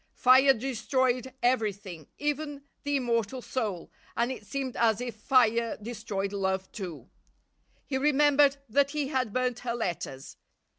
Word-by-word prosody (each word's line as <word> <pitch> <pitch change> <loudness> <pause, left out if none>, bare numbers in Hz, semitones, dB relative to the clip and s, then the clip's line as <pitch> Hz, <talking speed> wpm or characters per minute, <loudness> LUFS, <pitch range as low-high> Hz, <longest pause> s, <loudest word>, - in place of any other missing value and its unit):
Fire 265 +2 +6
destroyed 255 +1 0
everything, 205 - -1
even 295 -1 -3 0.2
the 285 0 -1
immortal 235 -2 0
soul, 215 -8 -4 0.3
and 235 +2 +1
it 255 - -7
seemed 270 -2 -3
as 225 -2 +2
if 245 -3 -4
fire 230 0 +2
destroyed 210 -3 -4
love 190 -1 -1
too. 180 -7 -7 0.8
He 265 -2 -2
remembered 290 0 +4
that 275 +5 +2
he 290 -2 -2
had 260 -6 -1
burnt 250 0 -1
her 235 -1 -3
letters. 170 - -4
245 Hz, 135 wpm, -28 LUFS, 210-270 Hz, 0.8 s, Fire